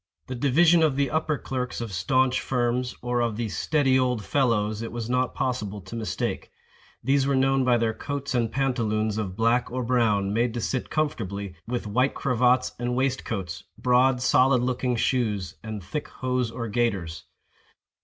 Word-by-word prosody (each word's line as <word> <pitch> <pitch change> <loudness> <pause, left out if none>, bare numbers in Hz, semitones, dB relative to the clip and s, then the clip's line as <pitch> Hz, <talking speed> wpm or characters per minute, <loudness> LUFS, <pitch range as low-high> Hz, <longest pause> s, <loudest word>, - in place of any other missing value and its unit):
The 130 - -6
division 155 +7 +4
of 155 -4 +3
the 140 -2 0
upper 155 -1 0
clerks 125 -2 -4
of 115 -4 -5
staunch 130 +9 +2
firms, 125 0 -1
or 120 0 0
of 115 -3 -1
the 115 -2 -2
"steady 130 - +2
old 125 -5 0
fellows," 110 -6 +1
it 115 - -5
was 120 0 -4
not 125 0 0
possible 105 -6 -2
to 95 +5 -9
mistake. 110 -2 -3 0.5
These 135 +2 +2
were 140 - +2
known 135 0 +3
by 125 -1 +4
their 115 -1 0
coats 140 +3 -4
and 115 -3 +1
pantaloons 110 -5 0
of 95 -4 -4
black 115 +3 +1
or 130 +1 -2
brown, 110 -5 +1
made 115 +1 +1
to - - -1
sit 130 +2 -2
comfortably, 100 - -2
with 120 -1 -3
white 125 +6 +1
cravats 125 -1 +2
and 120 0 -1
waistcoats, 120 -8 -2
broad 125 0 +3
solid 130 -1 +4
looking 125 0 0
shoes, 105 -9 -1
and 110 -2 -6
thick 145 +11 -4
hose 125 -2 -2
or 115 +1 -5
gaiters. 100 -8 -1
125 Hz, 170 wpm, -25 LUFS, 110-130 Hz, 0.5 s, division